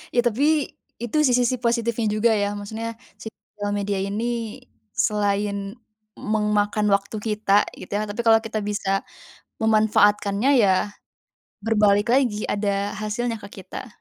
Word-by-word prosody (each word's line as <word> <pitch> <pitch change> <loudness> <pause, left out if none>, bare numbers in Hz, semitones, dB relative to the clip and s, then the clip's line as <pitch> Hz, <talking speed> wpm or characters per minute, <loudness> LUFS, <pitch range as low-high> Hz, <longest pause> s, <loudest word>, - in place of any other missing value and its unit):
Ya, 240 - +5
tapi, 285 +6 +2 0.3
itu 240 +5 -3
sih 250 - +3
sisi 250 0 +2
positifnya 235 -1 0
juga, 230 +2 +3
ya. 205 -1 0
Maksudnya 225 +3 -5 0.3
sosial 210 -2 -7
media 200 -1 -1
ini 225 +4 -3 0.3
selain 200 0 0 0.4
memakan 210 0 0
waktu 200 +2 -1
kita, 210 -1 +2
gitu, - - -11
ya, 210 +1 0
tapi 205 +3 -3
kalau 225 -1 +6
kita 220 -1 -3
bisa 195 -1 -1 0.5
memanfaatkannya 215 0 +3
ya 195 +1 +2 0.7
berbalik 210 -1 +3
lagi 240 -5 +2
ada 200 0 -1
hasilnya 225 +3 -2
ke 200 -2 -10
kita. 200 - -8
210 Hz, 130 wpm, -23 LUFS, 205-230 Hz, 0.7 s, kalau